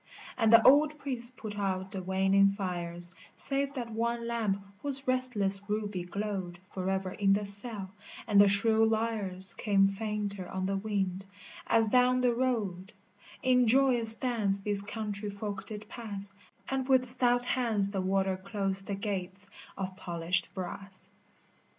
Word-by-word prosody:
And 225 -3 +2
the 230 0 +7
old 295 +3 +5
priest 255 -3 -4
put 210 -2 -7
out 190 -1 -2
the 190 - -4
waning 190 +1 +3
fires 175 -3 -5 0.2
Save 280 0 0
that 240 -3 -5
one 235 +1 -2
lamp 220 -4 -1 0.2
whose 275 -1 -2
restless 235 -7 +2
ruby 205 -4 -3
glowed 190 -2 -5
Forever 190 0 -3
in 195 +1 +2
the 205 +1 -1
cell, 200 -1 +4 0.3
and 205 -2 +5
the 205 - +6
shrill 220 +2 +3
lyres 210 -5 -1
Came 195 -2 +2
fainter 205 -2 -4
on 190 0 -3
the 195 +1 -1
wind, 195 -2 -3 0.4
as 225 -1 +3
down 250 +2 +3
the 250 -1 +2
road 220 -6 -2 0.5
In 250 -1 +3
joyous 240 -2 +5
dance 215 -6 0
these 205 0 0
country 205 0 -5
folk 200 -1 -6
did 215 -1 -8
pass, 205 -4 -8 0.4
And 270 0 -3
with 255 -1 +3
stout 245 0 +3
hands 225 -6 0
the 195 -2 -2
warder 190 0 0
closed 195 0 -2
the 200 - -2
gates 195 -1 -5 0.3
of 190 -1 -5
polished 175 -1 +3
brass. 190 +1 -6
205 Hz, 150 wpm, -29 LUFS, 195-235 Hz, 0.5 s, the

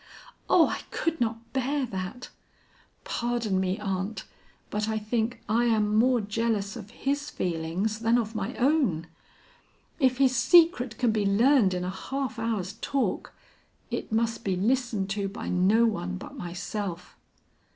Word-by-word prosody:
Oh, 330 - +6
I - - -3
could 330 -3 -2
not 230 0 -2
bear 270 +1 0
that. 195 +3 -6 0.7
Pardon 235 -5 -1
me, 190 +1 0
aunt, 195 0 -3 0.5
but 210 +1 -1
I 220 - 0
think 225 +2 -2
I 230 +3 +2
am 215 -2 +2
more 245 +3 +4
jealous 210 -1 -1
of 210 -4 -8
his 285 +5 -2
feelings 180 - -2
than 230 +1 +3
of 225 -2 -2
my 215 +3 -3
own. 255 - +2 0.9
If 260 -3 +3
his 260 -1 +3
secret 290 -11 +4
can 245 -3 +2
be 215 -1 0
learned 205 0 +4
in 180 - -2
a 180 - -2
half 265 +5 -4
hour's 215 -4 -2
talk, 260 -9 -1 0.6
it - - -4
must 230 +1 0
be 190 -2 0
listened 215 -1 0
to 200 -1 -1
by 200 - -6
no 195 +6 +4
one 90 - -1
but - - -10
myself. 180 +1 -5
220 Hz, 150 wpm, -27 LUFS, 195-245 Hz, 0.9 s, Oh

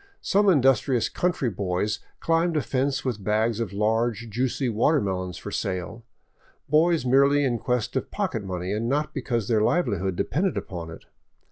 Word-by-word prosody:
Some 200 +1 +3
industrious 135 - +3
country 170 -9 0
boys 95 +2 -1 0.2
climbed 165 0 +1
a 150 - 0
fence 135 +3 -1
with 115 -6 -2
bags 110 +2 +1
of 115 -5 -2
large, 110 +2 0
juicy 130 +3 -1
watermelons 100 - 0
for 105 - -7
sale; 100 +2 -3 0.6
boys 160 +1 +3
merely 140 +3 +4
in 120 -4 0
quest 125 -1 -1
of 130 - -2
pocket 180 - -2
money 90 0 -3
and 115 +3 -1
not 150 +3 0
because 120 -6 -2
their 110 -3 +2
livelihood 100 - +1
depended 175 - -1
upon 85 -3 -5
it. 80 - -11
120 Hz, 155 wpm, -25 LUFS, 105-140 Hz, 0.6 s, merely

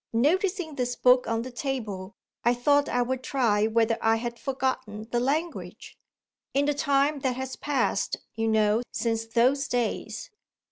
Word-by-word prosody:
Noticing 350 - +1
this 250 -3 -2
book 250 +1 +4
on 230 0 0
the 255 - -7
table, 225 -7 -4 0.3
I 240 +1 +3
thought 285 +4 +3
I 245 0 +2
would 260 +1 -2
try 225 -6 +2
whether 225 0 +2
I 225 0 +4
had 235 +1 -4
forgotten 255 -5 -3
the 240 - +2
language 305 +7 -3 0.6
in 280 +1 +3
the 295 - +2
time 285 0 +2
that 260 -2 -1
has 260 0 -4
passed 290 -2 0 0.2
(you 225 0 -1
know) 215 0 +3
since 225 -1 -1
those 255 +5 +2
days. 225 -3 -2
245 Hz, 155 wpm, -27 LUFS, 225-275 Hz, 0.6 s, book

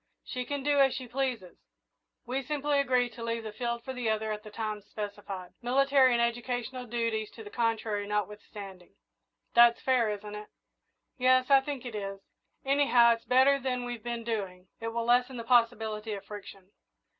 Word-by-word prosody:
She 250 0 -4
can 285 +1 -3
do 290 0 +2
as 270 -1 +4
she 255 -2 -6
pleases 240 -7 -3 0.7
we 255 +3 -2
simply 290 +1 0
agree 255 -3 +2
to 230 0 -9
leave 230 0 -2
the 215 - -5
field 235 +2 -3
for 260 - -5
the 250 -3 -2
other 220 0 0
at 210 0 -4
the 215 - -11
times 210 -1 -5
specified, 200 -3 -6
military 265 +1 +4
and 235 - +2
educational 245 +1 -2
duties 230 -2 -1
to 225 - -9
the 205 - -10
contrary 225 -3 -1
notwithstanding. 205 -2 -5 0.6
That's 235 0 +7
fair, 250 -4 +2
isn't 210 0 -5
it?" 210 0 -8 0.7
"Yes, 255 +1 +4
I 275 -1 +8
think 270 -2 -5
it 240 - -6
is. 195 -2 -5 0.5
Anyhow, 270 -4 +5
it's 230 - -8
better 265 +2 +5
than 250 -2 -2
we've 240 -2 -5
been 235 -1 -4
doing 190 -5 -4
it 225 - -4
will 230 0 -2
lessen 250 +2 +2
the 230 - -5
possibility 225 -2 +1
of 200 - -7
friction." 200 -2 -10
235 Hz, 180 wpm, -29 LUFS, 210-255 Hz, 0.7 s, I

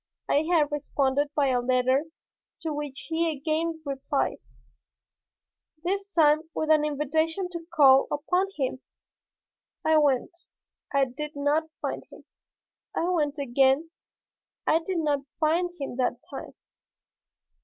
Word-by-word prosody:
I 290 - +3
had 305 -4 +3
responded 285 -1 0
by 280 -2 +3
a 250 -1 +2
letter 255 +3 +2 0.6
to 320 -2 -2
which 290 -2 -5
he 330 0 +1
again 320 +2 -2
replied, 275 0 -1 1.4
this 395 +3 -2
time 310 -2 +3
with 315 0 0
an 305 -1 +5
invitation 315 +5 0
to 335 -1 -7
call 275 -5 +6
upon 360 +6 0
him. 260 -2 -2 1.0
I 315 0 +5
went 285 +1 +1 0.6
I 275 -1 +3
did 295 +4 -7
not 295 +3 +1
find - - -2
him. - - -14 0.7
I 340 - 0
went 305 -4 0
again. 275 +3 +2 0.7
I 320 - +4
did 355 +2 -3
not 295 -3 +1 0.2
find 335 +3 +2
him 275 -3 -5
that 250 -1 +1 0.2
time. 275 - -8
300 Hz, 125 wpm, -27 LUFS, 275-325 Hz, 1.4 s, call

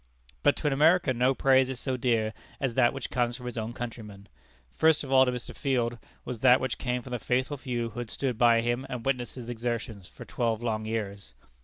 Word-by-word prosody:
But 145 - +4
to - - -8
an 145 - +3
American 150 -3 +3
no 130 +2 +3
praise 130 -1 +4
is 130 -2 -4
so 130 0 -2
dear 115 -3 0 0.3
as 135 -3 -1
that 120 -1 +4
which 135 - -6
comes 120 -1 0
from 125 - -11
his 125 - -5
own 110 0 -3
countrymen. 110 -5 -8 0.4
First 160 -1 +3
of 135 - -7
all 130 -1 +6
to - - +2
Mr. 125 -1 -7
Field, 120 -4 -1 0.3
was 125 -3 -5
that 125 +1 +6
which 130 -2 -3
came 125 -1 -2
from 125 - -10
the 125 - -2
faithful 130 +5 0
few 120 -4 -3
who 120 - -7
had 120 -2 -5
stood 130 +1 -2
by 115 0 +5
him 120 +2 -1
and 120 -2 -5
witnessed 125 -3 -1
his 125 -3 -8
exertions 115 -4 -4
for - - -12
twelve 115 -1 -1
long 110 -2 -1
years. 100 - -4
120 Hz, 225 wpm, -28 LUFS, 115-130 Hz, 0.4 s, all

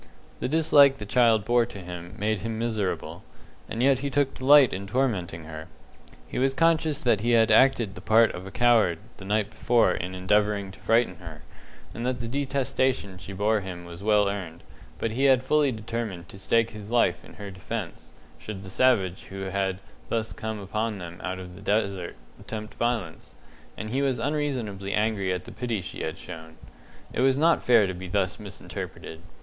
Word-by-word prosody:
The - - -1
dislike 145 -2 +5
the 105 - -7
child 110 -1 +3
bore 120 -1 +3
to 110 - -10
him 90 -2 -8
made 105 0 0
him 110 +2 -4
miserable, 110 -4 -2 0.5
and 115 - -2
yet 135 -1 +4
he 140 +1 -2
took 140 -1 +1
delight 140 -1 +6
in 100 +1 -5
tormenting 100 -9 -1
her. 80 0 -8 0.6
He - - -4
was 135 +1 +1
conscious 160 -2 +2
that 115 -5 +3
he 120 +2 +2
had 115 -1 +5
acted 115 -3 +4
the - - -10
part 110 +1 +4
of 90 +2 -8
a - - -6
coward 115 -5 +3 0.2
the 95 - -10
night 105 +1 0
before 120 -6 +3
in 90 +2 -4
endeavouring 100 +1 +1
to - - -15
frighten 115 -6 +2
her, 80 -3 -11 0.5
and 115 - -5
that 125 0 -1
the 115 - -4
detestation 130 -6 -1
she 90 +2 -9
bore 105 +3 +1
him 90 -2 -7
was 85 +1 -10
well 105 -1 +3
earned; 90 -5 -5 0.3
but 115 - -2
he 130 +5 0
had 130 -2 +5
fully 145 +1 +3
determined 110 -6 -5
to 95 - -12
stake 115 +4 +2
his 105 -1 -9
life 115 -7 +2
in - - -14
her 100 -1 -8
defence, 95 - -6 0.3
should 100 -3 -7
the 95 - -9
savage 95 -7 +2
who 95 0 -8
had 95 -1 -1 0.3
thus 110 -1 -1
come 110 -1 -5
upon 105 +2 -2
them 85 -2 -9
out 95 0 -3
of 90 -1 -9
the 95 - -12
desert 100 -4 -1 0.2
attempt 110 -1 -7
violence, 115 -9 -3 0.4
and 110 +2 -5
he 135 +3 0
was 135 -3 +1
unreasonably 120 -8 -2
angry 105 -3 0
at 90 0 -3
the - - -9
pity 120 -4 -3
she 80 -5 -7
had - - -4
shown. 80 0 -10 0.6
It - - -1
was 135 0 +4
not 165 +3 +4
fair 115 -4 +5
to 95 - -3
be 90 +1 -7
thus 95 +1 -1
misinterpreted. 95 -4 -8
110 Hz, 190 wpm, -26 LUFS, 95-120 Hz, 0.6 s, delight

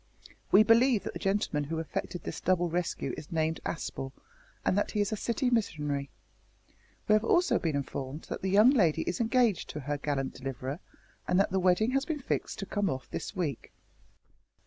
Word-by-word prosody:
We 205 - +8
believe 230 0 +4
that - - -5
the - - -6
gentleman 195 -7 0
who 160 +3 -3
effected 165 +2 -4
this - - -5
double 175 -2 +1
rescue 175 0 -2
is 155 - -9
named 160 0 0
Aspel, 135 -4 -4 0.5
and - - +3
that 205 - +1
he 210 - -2
is 205 +1 +1
a - - 0
city 245 +4 -1
missionary. 150 - -1 1.0
We - - +5
have 215 0 +4
also 350 +10 +3
been 160 -4 -1
informed 140 +1 -4
that - - -6
the 190 - -1
young 210 +6 +7
lady 180 - +3
is 175 - -3
engaged 230 -3 +2
to 150 - -5
her 145 +2 -3
gallant 135 -2 -2
deliverer, 135 +3 -5 0.5
and 180 - +3
that 195 - +2
the 190 - +2
wedding 185 +6 +3
has 270 +1 +1
been 315 -3 -2
fixed 260 - -2
to 195 - -4
come 205 -1 0
off 130 -4 -5
this - - -5
week." 155 -9 -3
180 Hz, 190 wpm, -30 LUFS, 150-215 Hz, 1.0 s, We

